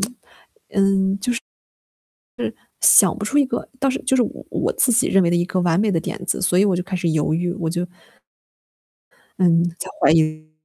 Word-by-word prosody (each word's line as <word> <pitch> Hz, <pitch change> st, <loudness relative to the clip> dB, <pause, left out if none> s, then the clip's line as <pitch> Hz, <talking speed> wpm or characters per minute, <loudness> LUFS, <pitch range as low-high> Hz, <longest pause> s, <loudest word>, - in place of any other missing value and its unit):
就 205 Hz, -, 0 dB
是， 245 Hz, -, -19 dB, 2.7 s
想 -, -, +6 dB
不 210 Hz, -, -4 dB
出 285 Hz, +7 st, -1 dB
一 285 Hz, -, +5 dB
个 265 Hz, -, -4 dB
倒 275 Hz, -1 st, +1 dB
是 260 Hz, -, -3 dB
就 265 Hz, -, +1 dB
是 245 Hz, -, +4 dB
我 -, -, -7 dB
我 -, -, -1 dB
自 265 Hz, -, +2 dB
己 240 Hz, -, +3 dB
认 195 Hz, -, +4 dB
为 170 Hz, -, +2 dB
的 175 Hz, -, +1 dB
一 175 Hz, -, +1 dB
个 185 Hz, 0 st, -2 dB
完 170 Hz, -2 st, +1 dB
美 210 Hz, -1 st, +1 dB
的 170 Hz, -, +1 dB
点 215 Hz, -, -5 dB
子， -, -, -2 dB
所 180 Hz, -1 st, +1 dB
以 -, -, +5 dB
我 195 Hz, -, +2 dB
就 180 Hz, -, -2 dB
开 190 Hz, 0 st, -5 dB
始 175 Hz, -2 st, -1 dB
犹 155 Hz, -1 st, 0 dB
豫， 175 Hz, +2 st, -1 dB
我 170 Hz, -5 st, -3 dB
就 175 Hz, +2 st, -2 dB, 1.5 s
嗯， 170 Hz, -2 st, +3 dB
在 -, -, -6 dB
怀 -, -, +4 dB
疑。 155 Hz, -1 st, 0 dB
180 Hz, 220 characters per minute, -20 LUFS, 165-210 Hz, 2.7 s, 想